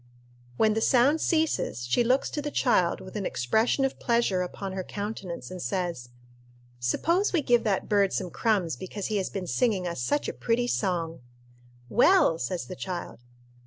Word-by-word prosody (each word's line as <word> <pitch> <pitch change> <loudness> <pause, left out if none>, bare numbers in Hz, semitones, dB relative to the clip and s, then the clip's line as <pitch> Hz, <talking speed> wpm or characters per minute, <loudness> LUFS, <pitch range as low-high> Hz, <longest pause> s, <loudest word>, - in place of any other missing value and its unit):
When 215 +5 +4
the 220 - -1
sound 270 +7 +4
ceases, 315 - 0
she 125 - +2
looks 255 +3 +1
to 295 - -3
the 295 - -3
child 235 -11 +2
with 185 +2 -11
an 210 - -2
expression 220 - +1
of 270 - -3
pleasure 235 -6 +1
upon 190 +2 -5
her 190 -1 -3
countenance, 200 -4 -6
and 185 -1 -6
says, 175 -11 -3 0.7
"Suppose 335 - +1
we 335 -5 +1
give 240 -2 +3
that 200 -3 0
bird 200 -2 +3
some 185 -3 -3
crumbs 190 - 0
because 190 +8 -6
he - - +2
has 190 - -1
been 195 -2 -4
singing 195 -2 0
us 170 -7 -4
such 290 - 0
a - - -3
pretty 235 +1 0
song." 175 - -1 0.7
"Well!" 240 - +4
says 170 +8 -3
the 185 - -7
child. 180 -7 -6
200 Hz, 175 wpm, -27 LUFS, 180-240 Hz, 0.7 s, When